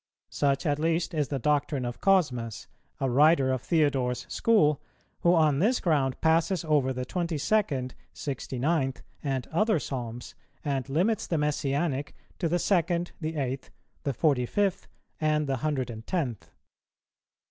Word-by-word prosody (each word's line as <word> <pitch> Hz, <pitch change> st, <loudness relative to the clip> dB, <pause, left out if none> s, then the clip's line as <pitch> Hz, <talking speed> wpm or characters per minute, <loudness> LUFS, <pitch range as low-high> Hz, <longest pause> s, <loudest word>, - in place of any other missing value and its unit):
Such 140 Hz, +2 st, +1 dB
at 145 Hz, -1 st, +1 dB
least 165 Hz, +2 st, 0 dB
is 150 Hz, -3 st, 0 dB
the 140 Hz, -, -2 dB
doctrine 145 Hz, -1 st, 0 dB
of 120 Hz, 0 st, -5 dB
Cosmas, 125 Hz, -, +1 dB, 0.3 s
a 135 Hz, -, 0 dB
writer 140 Hz, +1 st, +4 dB
of 130 Hz, -2 st, -1 dB
Theodore's 135 Hz, -6 st, +1 dB
school, 175 Hz, -11 st, +3 dB, 0.4 s
who 175 Hz, +1 st, +4 dB
on 155 Hz, -4 st, +3 dB
this 230 Hz, +8 st, +3 dB
ground 140 Hz, -6 st, +1 dB
passes 165 Hz, +2 st, +2 dB
over 145 Hz, -4 st, +2 dB
the 125 Hz, -1 st, -3 dB
twenty 170 Hz, +2 st, -2 dB
second, 140 Hz, -8 st, 0 dB, 0.2 s
sixty 135 Hz, -2 st, -5 dB
ninth, 135 Hz, -1 st, 0 dB, 0.2 s
and 135 Hz, -3 st, -1 dB
other 215 Hz, +5 st, +2 dB
Psalms, 125 Hz, -5 st, -5 dB, 0.3 s
and 135 Hz, -2 st, -1 dB
limits 190 Hz, +10 st, +1 dB
the 165 Hz, -, 0 dB
Messianic 145 Hz, 0 st, -1 dB, 0.2 s
to 170 Hz, -, 0 dB
the 175 Hz, -, +2 dB
second, 175 Hz, -1 st, +1 dB
the 160 Hz, +1 st, -3 dB
eighth, 135 Hz, -2 st, -3 dB, 0.3 s
the 140 Hz, -, -1 dB
forty 130 Hz, -3 st, +2 dB
fifth, 200 Hz, +3 st, 0 dB, 0.3 s
and 155 Hz, -1 st, +1 dB
the 135 Hz, -2 st, -1 dB
hundred 130 Hz, -3 st, -1 dB
and 110 Hz, 0 st, -9 dB
tenth. 120 Hz, -, -2 dB
145 Hz, 150 wpm, -28 LUFS, 130-165 Hz, 0.4 s, writer